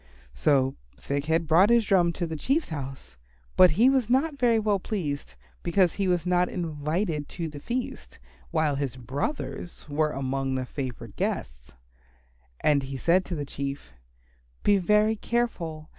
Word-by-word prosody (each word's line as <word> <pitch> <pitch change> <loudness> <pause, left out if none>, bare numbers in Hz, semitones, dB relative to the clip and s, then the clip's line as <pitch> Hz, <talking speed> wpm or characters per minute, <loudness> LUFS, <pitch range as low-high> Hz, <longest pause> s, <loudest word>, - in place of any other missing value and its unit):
So 135 - +2 0.2
Thick 140 0 -3
head 165 +1 +1
brought 170 +6 +5
his 235 -2 +4
drum 180 -4 +3
to 175 - -2
the 160 -1 -4
Chief's 275 - 0
house, 135 - -7 0.4
but 185 - +8
he 235 +4 +6
was 265 -4 +3
not 280 +3 +1
very 235 -2 +4
well 210 -2 +1
pleased, 160 -9 -4 0.3
because 180 0 +2
he 195 -2 -1
was 180 -1 +1
not 180 0 +2
invited 155 -1 -2
to 170 -2 -4
the 150 -2 -8
feast, 140 - -5 0.3
while 150 - +1
his 135 -4 -2
brothers 140 - -4
were 150 +1 +1
among 135 -1 -2
the 130 -1 -2
favoured 130 -2 -6
guests. - - -3 0.9
And 145 -2 +3
he 135 0 -5
said 175 +7 +3
to 175 - -4
the 145 -2 -3
Chief, 140 - -5 0.7
"Be 205 -1 +4
very 210 +4 +3
careful. 175 -10 -2
165 Hz, 160 wpm, -27 LUFS, 140-200 Hz, 0.9 s, but